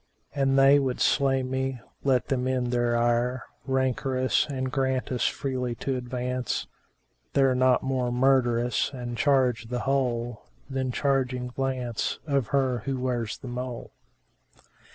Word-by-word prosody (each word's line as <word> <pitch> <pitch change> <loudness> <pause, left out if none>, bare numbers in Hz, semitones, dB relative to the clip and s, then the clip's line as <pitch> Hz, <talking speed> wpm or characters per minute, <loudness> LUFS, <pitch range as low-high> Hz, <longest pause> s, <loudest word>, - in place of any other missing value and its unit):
An 135 -1 +2
they 135 +1 +6
would 130 -3 -1
slay 135 -2 +2
me, 130 0 -2 0.2
let 130 -3 +2
them 130 -1 0
end 125 -2 0
their 120 -1 +1
ire 120 +2 +1
* - - -38
Rancorous, 130 0 +1
and 130 -3 -3
grant 130 -2 0
us 125 - +1
freely 125 -3 -2
to 135 +3 -2
advance: 125 0 -2 0.7
They're 135 -2 +4
not 130 0 +3
more 130 -2 0
murderous, 125 -2 +2
an 120 -2 -5
charge 130 -4 +2
the 125 +1 -3
whole 120 -4 -1 0.2
* - - -33
Than 130 -1 -1
charging 130 -2 0
glance 125 -3 -2
of 140 -6 0
her 130 -3 +1
who 135 -1 -2
wears 120 -3 -2
the 130 - -10
mole." 125 0 -5
130 Hz, 145 wpm, -27 LUFS, 125-135 Hz, 0.7 s, they